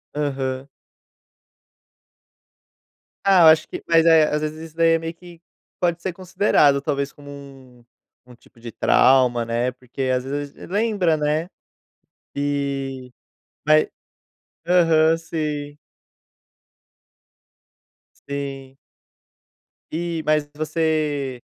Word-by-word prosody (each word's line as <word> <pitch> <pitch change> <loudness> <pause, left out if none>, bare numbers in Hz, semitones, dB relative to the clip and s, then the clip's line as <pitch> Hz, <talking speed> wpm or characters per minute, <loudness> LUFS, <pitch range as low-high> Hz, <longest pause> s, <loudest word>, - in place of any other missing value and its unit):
Aham. 135 -2 -3 2.6
Ah, 195 -2 +5
eu - - +8
acho 160 0 +5
que - - -8
mas 165 -1 +4
é, 165 -1 +6
às 150 0 -1
vezes 155 0 -4
isso 160 - -26
daí 165 0 +4
é 165 - +2
meio 165 0 -5
que 170 -1 -15 0.4
pode 170 -1 0
ser 185 - -3
considerado, 170 -6 +2
talvez, 140 -1 -2
como 145 0 -14
um 135 -4 -13 0.4
um 125 0 -16
tipo 120 - -24
de 115 0 -9
trauma, 125 0 +3
né, 120 +2 -1
porque 125 +1 -7
às 125 - -2
vezes 145 +1 -5 0.2
lembra, 200 -5 +1
né, 150 +3 -1 0.9
e 140 -2 -3 0.6
vai 155 0 +4 0.8
aham, 165 -2 +4
sim. 150 -3 -4 2.5
Sim. 135 -1 -6 1.2
E 170 0 -3
mas 150 -1 +1
você 155 -4 -1
150 Hz, 105 wpm, -22 LUFS, 135-165 Hz, 2.6 s, eu